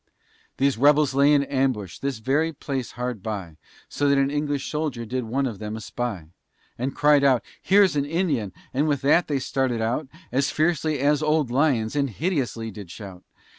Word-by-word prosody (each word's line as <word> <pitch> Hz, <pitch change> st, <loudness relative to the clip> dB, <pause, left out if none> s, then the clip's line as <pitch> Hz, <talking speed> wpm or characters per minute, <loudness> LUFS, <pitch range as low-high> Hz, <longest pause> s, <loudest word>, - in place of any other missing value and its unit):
These 135 Hz, -3 st, +1 dB
rebels 145 Hz, 0 st, +4 dB
lay 140 Hz, +2 st, +4 dB
in 145 Hz, -1 st, +4 dB
ambush, 130 Hz, -9 st, -1 dB
this 140 Hz, -3 st, -2 dB
very 140 Hz, +8 st, +1 dB
place 135 Hz, -3 st, -4 dB
hard 125 Hz, -3 st, -4 dB
by, 95 Hz, -7 st, -5 dB, 0.3 s
So 145 Hz, 0 st, 0 dB
that 140 Hz, -, +4 dB
an 135 Hz, 0 st, +2 dB
English 145 Hz, -1 st, -2 dB
soldier 150 Hz, -7 st, -3 dB
did 125 Hz, +2 st, -3 dB
one 135 Hz, +5 st, -1 dB
of 115 Hz, -6 st, -4 dB
them 105 Hz, 0 st, -5 dB
espy, 110 Hz, -4 st, -4 dB, 0.5 s
And 130 Hz, +3 st, -3 dB
cried 145 Hz, -1 st, +4 dB
out, 130 Hz, -3 st, +4 dB, 0.2 s
"Here's 195 Hz, -3 st, +4 dB
an 140 Hz, -1 st, +1 dB
Indian," 150 Hz, -, -1 dB, 0.2 s
with 145 Hz, 0 st, 0 dB
that 165 Hz, +5 st, +4 dB
they 145 Hz, -, 0 dB
started 130 Hz, -2 st, -1 dB
out, 120 Hz, +6 st, -1 dB, 0.2 s
As 135 Hz, +2 st, +1 dB
fiercely 155 Hz, -1 st, +1 dB
as 145 Hz, +2 st, +2 dB
old 155 Hz, -4 st, +1 dB
lions, 130 Hz, -3 st, +1 dB
and 140 Hz, -2 st, +1 dB
hideously 125 Hz, -, -2 dB
did 100 Hz, -3 st, -10 dB
shout. 95 Hz, -1 st, -10 dB
135 Hz, 175 wpm, -24 LUFS, 115-145 Hz, 0.5 s, rebels